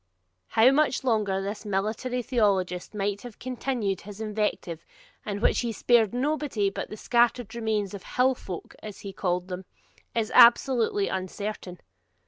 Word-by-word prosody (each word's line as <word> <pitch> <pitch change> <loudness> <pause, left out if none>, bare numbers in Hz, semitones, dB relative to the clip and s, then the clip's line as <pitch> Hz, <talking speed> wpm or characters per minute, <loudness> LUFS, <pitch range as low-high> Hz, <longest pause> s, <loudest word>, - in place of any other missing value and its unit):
How 230 +3 +5
much 285 -2 +2
longer 210 -6 +1
this 205 +3 -5
military 215 +5 -2
theologist 200 -6 0
might 200 0 -1
have 240 -4 -10
continued 245 -6 -2
his 205 +1 -10
invective, 210 -6 -2 0.4
in 205 -1 -3
which - - +3
he 235 - -1
spared 225 -1 +3
nobody 255 -5 0
but - - -5
the 215 - -7
scattered 240 0 +1
remnant 220 -4 -1
of 200 - -6
HILL 255 +6 +2
FOLK, 185 -8 -8
as 210 -2 -9
he 200 -1 -7
called 180 -1 -1
them, 185 0 -5 0.5
is 225 -2 0
absolutely 235 -4 +5
uncertain. 190 -1 -5
215 Hz, 145 wpm, -27 LUFS, 195-240 Hz, 0.5 s, How